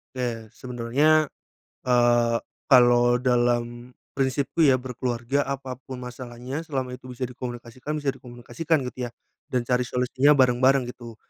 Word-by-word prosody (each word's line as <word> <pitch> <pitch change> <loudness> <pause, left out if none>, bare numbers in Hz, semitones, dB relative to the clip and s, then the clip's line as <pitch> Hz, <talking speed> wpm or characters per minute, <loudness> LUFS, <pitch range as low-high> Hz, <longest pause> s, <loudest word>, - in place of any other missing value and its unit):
Ya 115 -3 -4
sebenarnya, 130 +6 +1 0.6
eee, 120 -1 +4 0.3
kalau 120 -2 +6
dalam 120 0 0 0.2
prinsipku 135 +4 -1
ya 135 -5 +6
berkeluarga 125 +1 -2
apa 135 -1 -4 0.2
pun 130 - -5
masalahnya 125 +3 -6
selama 135 -6 -4
itu 130 0 -10
bisa 125 +1 -4
dikomunikasikan, 125 +3 -6
bisa 145 -3 -1
dikomunikasikan 130 +5 -3
gitu 125 -1 -4
ya - - -14 0.4
dan 125 -2 -1
cari 125 0 0
solusinya 130 +3 +3
bareng-bareng, 130 +1 +4
gitu. 115 -3 -11
125 Hz, 125 wpm, -25 LUFS, 120-135 Hz, 0.6 s, kalau